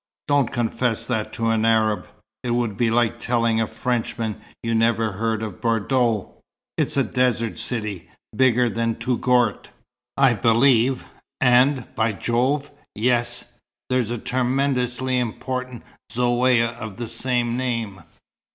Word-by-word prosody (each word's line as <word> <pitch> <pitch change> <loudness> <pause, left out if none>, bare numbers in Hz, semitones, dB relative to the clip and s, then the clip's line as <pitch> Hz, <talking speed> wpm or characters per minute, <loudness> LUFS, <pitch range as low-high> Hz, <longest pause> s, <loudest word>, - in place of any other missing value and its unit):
"Don't 145 -3 +2
confess 120 -2 -1
that 110 -3 -2
to 115 0 0
an 110 -1 +1
Arab. 110 -2 +2 0.3
It 125 - -4
would 120 -4 -1
be 115 +3 +1
like 115 0 +1
telling 115 -2 +1
a 110 - 0
Frenchman 115 -3 -3 0.2
you'd 115 -1 0
never 115 -1 +2
heard 110 +2 -2
of 105 -4 -7
Bordeaux. 115 -1 0 0.4
It's - - 0
a - - +4
desert 120 -3 0
city, 105 -7 -4 0.3
bigger 125 0 +4
than 115 0 -1
Touggourt, 125 -1 +1 0.5
I 135 -2 +5
believe, 120 +3 +3 0.3
and 125 0 +4
by 110 0 +1
Jove, 130 +7 0 0.2
yes, 120 +1 0 0.5
there's 125 -4 +1
a 120 - -2
tremendously 130 0 0
important 125 +1 -4 0.3
Zaouïa 120 -1 +2
of 110 -4 -7
the 120 - -4
same 120 +1 0
name. 115 -7 -3
120 Hz, 130 wpm, -22 LUFS, 115-125 Hz, 0.5 s, I